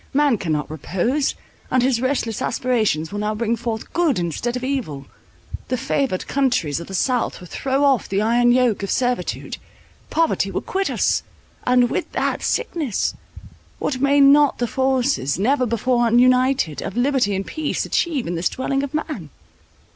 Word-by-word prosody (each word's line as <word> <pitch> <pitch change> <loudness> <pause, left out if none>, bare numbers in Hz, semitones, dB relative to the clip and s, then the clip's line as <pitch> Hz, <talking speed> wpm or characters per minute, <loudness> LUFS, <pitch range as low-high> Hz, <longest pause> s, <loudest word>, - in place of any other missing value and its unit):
Man 285 -6 +3
cannot 155 -4 -2
repose, 210 - -1 0.3
and 255 -1 +2
his 250 -2 +1
restless 255 -4 -1
aspirations 215 -11 0
will 205 - -4
now 210 +1 -1
bring 230 +1 0
forth 230 -1 -5
good 335 -7 +2
instead 175 +8 -2
of 250 - -4
evil. 235 - -3 0.6
The 255 - -1
favoured 265 -5 -1
countries 250 - 0
of 170 - -8
the 195 - -6
south 250 +5 0
will 180 - -11
throw 270 +9 -1
off 270 -6 +2
the 195 - 0
iron 240 +3 +3
yoke 245 -4 +2
of 200 - -4
servitude; 250 -1 -1 0.5
poverty 330 0 +1
will - - -3
quit 390 +1 -2
us, - - +1 0.5
and 250 -1 +4
with - - -2
that, - - -1
sickness. 295 - -1 0.6
What 260 -3 -2
may 280 +1 +4
not 280 +1 +6
the 240 - 0
forces, 260 - 0
never 255 +6 +2
before 240 +1 +1
united, 250 - +3
of 195 - -5
liberty 245 -5 +2
and 195 +1 -3
peace 315 -1 -2
achieve 310 -7 0
in 170 - -3
this 170 +1 0
dwelling 270 +1 -1
of 280 +1 -4
man?" 295 - -4
245 Hz, 165 wpm, -21 LUFS, 205-270 Hz, 0.6 s, not